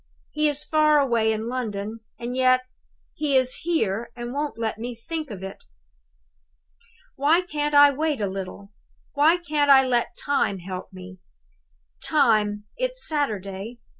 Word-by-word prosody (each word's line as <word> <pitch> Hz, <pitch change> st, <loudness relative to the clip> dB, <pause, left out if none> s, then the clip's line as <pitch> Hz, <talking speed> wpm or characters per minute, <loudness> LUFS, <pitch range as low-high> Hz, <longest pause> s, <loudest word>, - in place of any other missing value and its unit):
He 305 Hz, 0 st, +2 dB
is 290 Hz, 0 st, -2 dB
far 305 Hz, -1 st, +3 dB
away 235 Hz, -5 st, +2 dB
in 220 Hz, +1 st, -3 dB
London; 225 Hz, -3 st, -4 dB, 0.2 s
and 240 Hz, +1 st, -5 dB
yet, 255 Hz, 0 st, +4 dB, 0.5 s
he 290 Hz, -3 st, +1 dB
is 255 Hz, 0 st, +2 dB
here 235 Hz, -, -1 dB
and 240 Hz, 0 st, -6 dB
won't 290 Hz, -1 st, -3 dB
let 220 Hz, -1 st, -3 dB
me 240 Hz, +1 st, -5 dB
think 310 Hz, +6 st, -5 dB
of 195 Hz, -4 st, -8 dB
it! 195 Hz, 0 st, -8 dB, 1.5 s
"Why 300 Hz, +6 st, +4 dB
can't 295 Hz, -4 st, -2 dB
I 285 Hz, 0 st, +8 dB
wait 300 Hz, -1 st, -1 dB
a 205 Hz, -, 0 dB
little? 195 Hz, +1 st, -6 dB, 0.4 s
Why 305 Hz, +4 st, +4 dB
can't 300 Hz, -4 st, 0 dB
I 265 Hz, -1 st, +7 dB
let 240 Hz, -2 st, 0 dB
Time 280 Hz, -8 st, 0 dB
help 185 Hz, 0 st, -7 dB
me? 185 Hz, 0 st, -11 dB, 0.8 s
Time? 215 Hz, -7 st, +2 dB
It's -, -, -1 dB
Saturday! 215 Hz, -, -3 dB
255 Hz, 145 wpm, -24 LUFS, 215-295 Hz, 1.5 s, I